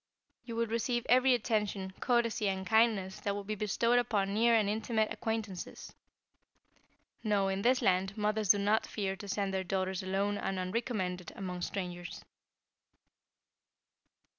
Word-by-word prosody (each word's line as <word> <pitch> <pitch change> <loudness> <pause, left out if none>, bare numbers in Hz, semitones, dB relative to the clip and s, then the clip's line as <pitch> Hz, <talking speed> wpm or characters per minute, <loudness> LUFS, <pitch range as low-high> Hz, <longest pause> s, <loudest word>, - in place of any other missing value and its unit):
You 230 - -6
will 230 0 +1
receive 235 +2 -1
every 255 +1 +5
attention, 210 -5 -1
courtesy 230 -4 +1
and 190 0 -3
kindness 220 -3 +2
that 200 -1 -2
would 200 -1 -5
be 215 - -2
bestowed 225 +4 +2
upon 205 -5 0
near 230 +2 +4
and 215 -2 +3
intimate 220 +1 0
acquaintances. 220 -5 -4 1.3
No, 205 -3 +2
in 195 0 -1
this 255 +4 +3
land, 190 +2 +1
mothers 210 -1 0
do 205 - +7
not 205 +2 +1
fear 195 -3 -2
to 200 +2 -9
send 200 -1 -1
their 190 0 0
daughters 185 0 -1
alone 195 +2 -1
and 195 - -2
unrecommended 185 -2 -2
among 180 -2 -5
strangers." 175 -2 -5
205 Hz, 140 wpm, -32 LUFS, 190-225 Hz, 1.3 s, do